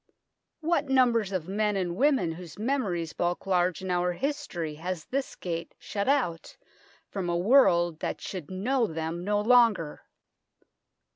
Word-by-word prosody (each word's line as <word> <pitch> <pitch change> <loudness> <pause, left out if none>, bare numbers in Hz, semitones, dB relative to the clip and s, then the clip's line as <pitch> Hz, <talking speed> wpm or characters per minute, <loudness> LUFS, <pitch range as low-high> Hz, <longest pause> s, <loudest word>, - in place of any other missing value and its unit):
What 325 -3 0
numbers 240 -6 +3
of 180 -4 -3
men 210 +2 0
and 180 -3 -1
women 260 - +2
whose 170 0 -9
memories 205 - -1
bulk 175 +2 -2
large 180 -1 +1
in 185 - -2
our 180 0 +1
history 175 - -3
has 165 +1 -5
this 270 +1 -3
gate 170 -2 -5
shut 200 +3 -3
out 240 - 0 0.5
from 190 -3 -4
a 170 - +1
world 175 - +4
that - - -3
should 180 -6 -6
know 230 +6 0
them 165 0 -4
no 205 +2 +1
longer 220 -8 +3
185 Hz, 145 wpm, -28 LUFS, 175-235 Hz, 0.5 s, world